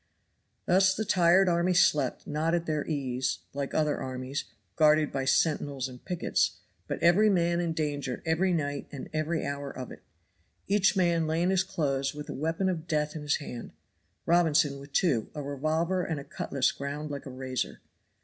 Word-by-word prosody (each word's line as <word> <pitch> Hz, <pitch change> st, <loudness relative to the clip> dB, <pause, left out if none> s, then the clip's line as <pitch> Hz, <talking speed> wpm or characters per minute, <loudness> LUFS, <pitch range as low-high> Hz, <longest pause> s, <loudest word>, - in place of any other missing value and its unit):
Thus 190 Hz, +1 st, +4 dB
the 220 Hz, -, -2 dB
tired 185 Hz, -1 st, +4 dB
army 175 Hz, +1 st, +2 dB
slept 145 Hz, -7 st, +3 dB
not 155 Hz, +3 st, 0 dB
at 170 Hz, -1 st, -1 dB
their 155 Hz, -2 st, -1 dB
ease, 130 Hz, -, -1 dB, 0.2 s
like 140 Hz, -1 st, -4 dB
other 150 Hz, -2 st, +1 dB
armies, 130 Hz, +2 st, -4 dB, 0.3 s
guarded 155 Hz, -1 st, +4 dB
by 135 Hz, -1 st, -2 dB
sentinels 140 Hz, -2 st, +1 dB
and 125 Hz, -1 st, -12 dB
pickets, 180 Hz, -2 st, 0 dB, 0.3 s
but -, -, -2 dB
every 195 Hz, +6 st, +5 dB
man 170 Hz, -3 st, +2 dB
in 170 Hz, -1 st, 0 dB
danger 145 Hz, -5 st, -3 dB
every 165 Hz, +4 st, +2 dB
night 145 Hz, -4 st, -2 dB
and 140 Hz, -, -8 dB
every 155 Hz, +1 st, -1 dB
hour 140 Hz, 0 st, -4 dB
of 130 Hz, -2 st, -7 dB
it. -, -, -11 dB, 0.7 s
Each 200 Hz, 0 st, +3 dB
man 170 Hz, -3 st, +2 dB
lay 160 Hz, +2 st, +1 dB
in 180 Hz, -, +2 dB
his 185 Hz, -1 st, +3 dB
clothes 145 Hz, -8 st, -1 dB
with 150 Hz, 0 st, -7 dB
a -, -, -3 dB
weapon 165 Hz, +6 st, -1 dB
of 170 Hz, -3 st, -2 dB
death 150 Hz, -1 st, 0 dB
in 155 Hz, -, -5 dB
his 145 Hz, 0 st, +1 dB
hand; 125 Hz, -, -7 dB, 0.5 s
Robinson 155 Hz, -5 st, +3 dB
with 140 Hz, +1 st, -12 dB
two, 140 Hz, -, +1 dB
a 150 Hz, -, -4 dB
revolver 155 Hz, +6 st, 0 dB
and 160 Hz, -4 st, -3 dB
a -, -, -7 dB
cutlass 140 Hz, -1 st, -1 dB
ground 145 Hz, +2 st, -5 dB
like 140 Hz, 0 st, -6 dB
a -, -, -7 dB
razor. 130 Hz, -1 st, -4 dB
155 Hz, 180 wpm, -29 LUFS, 140-170 Hz, 0.7 s, every